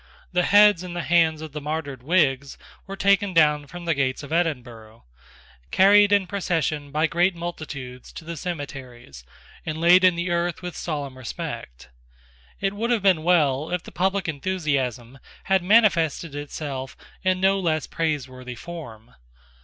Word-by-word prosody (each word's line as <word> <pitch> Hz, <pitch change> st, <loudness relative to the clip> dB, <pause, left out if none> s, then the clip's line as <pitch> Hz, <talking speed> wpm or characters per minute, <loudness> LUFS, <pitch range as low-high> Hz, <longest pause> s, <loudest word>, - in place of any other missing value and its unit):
The 180 Hz, -, +2 dB
heads 205 Hz, -1 st, +5 dB
and 180 Hz, -1 st, -7 dB
the 175 Hz, -, -3 dB
hands 160 Hz, -2 st, +2 dB
of 155 Hz, -, -8 dB
the 150 Hz, +1 st, -6 dB
martyred 145 Hz, -3 st, -4 dB
Whigs 140 Hz, -3 st, +1 dB, 0.3 s
were 195 Hz, -, -6 dB
taken 200 Hz, 0 st, +2 dB
down 150 Hz, -2 st, +3 dB
from 175 Hz, +4 st, -9 dB
the 165 Hz, -, +2 dB
gates 135 Hz, -1 st, -1 dB
of 140 Hz, -, -7 dB
Edinburgh, 120 Hz, -, -3 dB, 0.6 s
carried 205 Hz, +1 st, +5 dB
in 200 Hz, -2 st, +4 dB
procession 160 Hz, -7 st, -2 dB
by 155 Hz, +2 st, +1 dB
great 175 Hz, +3 st, +1 dB
multitudes 145 Hz, -7 st, -7 dB
to 165 Hz, -, -10 dB
the 170 Hz, +1 st, -5 dB
cemeteries, 135 Hz, -, -7 dB, 0.4 s
and 160 Hz, 0 st, -4 dB
laid 175 Hz, +2 st, +6 dB
in 185 Hz, -2 st, +5 dB
the 175 Hz, +1 st, -2 dB
earth 175 Hz, +1 st, -1 dB
with 180 Hz, -1 st, -6 dB
solemn 140 Hz, -5 st, -5 dB
respect, 65 Hz, -, -7 dB, 0.7 s
It 195 Hz, 0 st, -1 dB
would 225 Hz, +3 st, -2 dB
have 235 Hz, -5 st, +1 dB
been 185 Hz, -5 st, +4 dB
well 155 Hz, -4 st, +2 dB
if 180 Hz, -1 st, -2 dB
the -, -, -11 dB
public 190 Hz, +2 st, -1 dB
enthusiasm 140 Hz, -7 st, -2 dB, 0.2 s
had 190 Hz, -1 st, +2 dB
manifested 175 Hz, -6 st, +3 dB
itself 145 Hz, -2 st, -6 dB, 0.2 s
in 185 Hz, -1 st, +1 dB
no 195 Hz, +1 st, +3 dB
less 160 Hz, -4 st, 0 dB
praiseworthy 130 Hz, -6 st, -4 dB
form. 125 Hz, -9 st, -10 dB
160 Hz, 155 wpm, -24 LUFS, 140-180 Hz, 0.7 s, laid